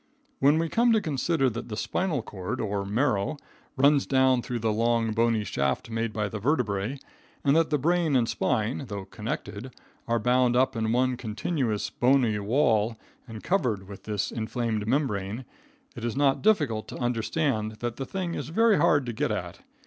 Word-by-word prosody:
When 145 +3 +5
we 165 +1 +1
come 235 +7 +3
to 220 - +4
consider 155 -4 0
that 115 +2 -6
the 105 - -5
spinal 155 -1 -1
cord, 95 -4 -5
or 100 -2 -1
marrow, 115 +5 0 0.4
runs 140 +1 +4
down 130 -2 +3
through 120 0 -4
the 110 -1 0
long, 115 0 +1
bony 115 -1 +2
shaft 70 - -2
made 115 0 -1
by 105 -1 -2
the 105 +1 -5
vertebrae, 120 -2 0 0.5
and 140 +1 +3
that 165 0 +3
the 150 - +2
brain 165 +1 +1
and 120 -3 +3
spine, 120 +2 -1
though 100 -3 -5
connected, 105 +2 -6 0.4
are 115 0 +2
bound 125 +1 +2
up 130 0 +2
in 110 -1 0
one 125 +1 +1
continuous 115 0 -2
bony 120 -4 +2
wall 110 0 +2 0.3
and 110 -2 -9
covered 115 - 0
with 100 -1 -11
this 105 -3 -2
inflamed 110 -2 -2
membrane, 115 -4 -1 0.5
it 115 - -8
is 120 0 -2
not 140 -1 +2
difficult 145 - +2
to - - -7
understand 120 -1 -1
that 120 +1 -5
the 135 - -3
thing 185 -3 -3
is 145 -3 -4
very 220 +4 +4
hard 145 -3 +3
to 120 - -4
get - - -1
at. - - -4
120 Hz, 180 wpm, -27 LUFS, 110-140 Hz, 0.5 s, When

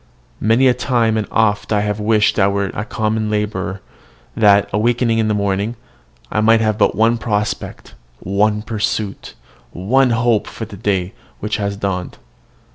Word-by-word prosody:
Many 115 +5 +3
a 125 - +5
time 115 -4 +1
and 110 -2 -1
oft 105 -2 +1
I 105 -1 +1
wish 110 +1 +1
I 95 - +4
were 100 -1 -1
a 105 - -3
common 110 -1 -1
labourer; 100 -2 -2 0.5
that, 100 -2 +4
awakening 115 +1 +1
in 110 - +1
the 105 - +1
morning, 100 +3 -1 0.6
I 105 - +1
might 115 +1 +5
have 110 -1 0
but - - +3
one 115 +2 +2
prospect, 105 -2 -3 0.3
one 105 +2 0
pursuit, 105 -2 -3 0.4
one 125 +9 +2
hope, 115 -2 +1
for 110 - -6
the 105 - -11
day 95 -3 -1 0.3
which 105 +1 -2
has 100 -1 -3
dawned. 95 -3 -3
105 Hz, 155 wpm, -18 LUFS, 100-115 Hz, 0.6 s, a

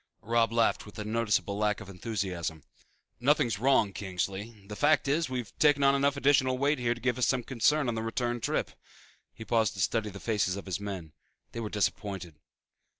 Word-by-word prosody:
Robb 115 0 +2
laughed 115 -2 +1
with 105 - -12
a 105 - -3
noticeable 105 -2 0
lack 105 -1 +1
of 100 - -10
enthusiasm. 90 -6 -4 0.6
"Nothing 140 +4 +3
is 110 -4 -2
wrong, 125 -5 +3
Kingsley. 100 +2 -4
The 105 - -6
fact 145 +3 +3
is 150 +1 +1
we've 125 -4 -5
taken 145 -2 +4
on 135 0 +6
enough 140 +1 +2
additional 135 -2 +3
weight 145 +2 +1
here 120 -1 +1
to - - -11
give 125 +1 0
us 120 - +3
some 125 -2 +1
concern 135 +4 +2
on 120 - 0
the 110 - -2
return 120 +1 -2
trip." - - -1 0.6
He 110 - -10
paused 110 -3 +1
to - - -8
study 110 +3 0
the 100 0 -9
faces 105 -4 0
of 100 - -7
his 95 0 -3
men. 95 -6 -6 0.4
They 115 - -6
were 110 -2 -3
disappointed. 95 -6 -2
115 Hz, 200 wpm, -29 LUFS, 100-130 Hz, 0.6 s, on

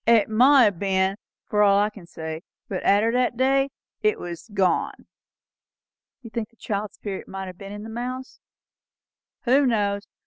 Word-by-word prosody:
It 230 -3 +5
mought 245 0 +6
ha' 170 - -16
ben, 190 -1 +1 0.3
for 210 -1 +1
all 200 -1 +5
I 205 +1 +2
can 200 -5 -13
say; 160 -1 -6 0.3
but 190 - -4
arter 210 +3 +4
that 245 -1 +1
day, 270 +1 +3 0.3
it 430 0 +2
was 170 +2 -7
gone." 195 -3 0 1.2
"You 230 - -10
think 225 -3 -3
the 230 - -30
child's 210 -2 -4
spirit 200 -2 -6
might 190 0 -6
have 185 -1 -10
been 195 0 -8
in 205 0 -7
the 225 - -8
mouse?" 255 +3 -5 1.0
"Who 270 +2 +4
knows? 200 -3 0
210 Hz, 170 wpm, -24 LUFS, 195-240 Hz, 1.2 s, mought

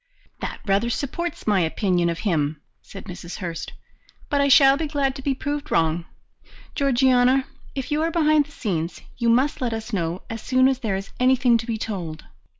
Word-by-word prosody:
"That - - -5
rather 200 +3 +2
supports 315 +8 -3
my 205 -3 +3
opinion 175 +1 +1
of 170 - -2
him," 155 -7 0 0.2
said 195 - -11
Mrs. 180 -1 -8
Hurst. 170 -4 -5 0.6
"But 285 -1 +3
I 280 - +3
shall 270 0 +7
be 310 +2 -2
glad 280 -2 0
to 270 - -7
be 270 0 0
proved 290 +2 -4
wrong. 165 +1 +1 0.7
Georgiana, 260 -1 +3 0.3
if 270 +1 -4
you 300 +1 +1
are 325 - +1
behind 310 -3 +3
the - - -18
scenes, 175 - -3 0.2
you 235 -1 +2
must 270 +6 +2
let 240 -3 0
us 225 +1 -6
know 175 -1 -2
as 225 -1 -6
soon 255 0 +3
as 265 -1 +1
there 220 -7 -1
is 195 +1 -6
anything 255 -1 +4
to 230 - -6
be 230 -2 -1
told." 175 -8 -5
240 Hz, 190 wpm, -23 LUFS, 185-275 Hz, 0.7 s, shall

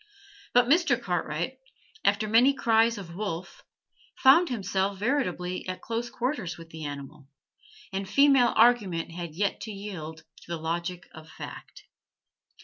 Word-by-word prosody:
But 245 0 +6
Mr. 285 -2 +3
Cartwright, 175 +7 -3 0.4
after 210 +1 +2
many 245 +6 +5
cries 230 -1 +3
of 175 -4 -8
'Wolf,' 175 -3 -5 0.5
found 330 +7 +6
himself 200 -4 -1
veritably 185 -7 -1
at 185 0 -4
close 230 +1 -3
quarters 235 - -3
with 165 -1 -12
the 160 -1 -7
animal, 140 -1 -8 0.7
and 190 0 -3
female 275 -4 +5
argument 210 -9 +3
had 170 -2 -7
to 205 +3 -2
yield 180 -6 -7 0.2
to - - -17
the 170 -1 -3
logic 170 +3 -4
of 160 0 -12
fact. - - -10
195 Hz, 135 wpm, -27 LUFS, 170-240 Hz, 0.7 s, But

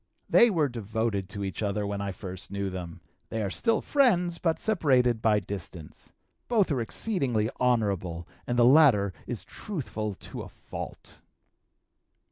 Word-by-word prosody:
"They 240 - +7
were 165 -8 +2
devoted 110 -4 -2
to 100 0 -5
each 95 -1 -4
other 105 0 -1
when 100 0 -3
I 100 -1 -2
first 95 0 -6
knew 100 0 -3
them; 90 -2 -7 0.3
they 110 -1 -2
are 100 - -2
still 230 - +1
friends, 180 -12 +2
but 165 -2 +1
separated 130 - +2
by 105 -2 +4
distance. 90 -5 -8 0.4
Both 215 -8 +2
are 130 -4 +1
exceedingly 120 - 0
honorable, 100 -9 0 0.2
and 120 - -1
the 120 - +6
latter 125 -9 +6
is 120 - -3
truthful 110 - -4
to - - -8
a - - -8
fault." - - -9
110 Hz, 150 wpm, -28 LUFS, 100-145 Hz, 0.4 s, They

